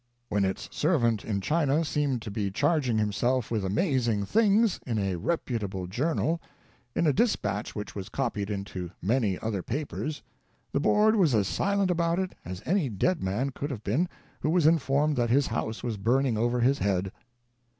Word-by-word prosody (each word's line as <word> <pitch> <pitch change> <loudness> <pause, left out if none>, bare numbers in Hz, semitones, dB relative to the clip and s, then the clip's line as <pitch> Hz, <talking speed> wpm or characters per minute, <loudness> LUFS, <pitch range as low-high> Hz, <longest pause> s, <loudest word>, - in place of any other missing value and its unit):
When 100 -1 +2
its 95 - -3
servant 120 - +2
in 100 -3 -2
China 155 - +1
seemed 140 -6 0
to 105 - -6
be 100 -1 -1
charging 125 - +1
himself 115 +4 0
with 110 -4 0
amazing 115 - +1
things, 215 - +3
in 115 -3 -1
a 95 -3 0
reputable 100 - -2
journal, 160 - 0 0.3
— 120 +1 -35
in - - +2
a 150 - +4
dispatch 105 - 0
which 105 - -5
was 100 0 -6
copied 110 -6 -2
into 100 -3 -4
many 105 -1 +1
other 110 -4 -2
papers 145 - -4 0.2
— - - -41
the - - +2
Board 210 +8 +4
was 165 - +4
as 100 -3 +2
silent 200 - +1
about 170 -1 +1
it 190 -1 -2
as 90 +3 -7
any 175 -6 +1
dead 160 - 0
man 105 +9 -1
could 145 +2 -4
have 120 -7 -6
been 150 - +1 0.3
who 150 - -1
was 170 -1 +3
informed 150 -1 +3
that 120 -1 +1
his 135 +3 +4
house 110 0 -3
was 115 -4 -2
burning 120 +4 +2
over 120 +2 +1
his 135 +4 +3
head. 95 -1 0
120 Hz, 180 wpm, -28 LUFS, 105-155 Hz, 0.3 s, a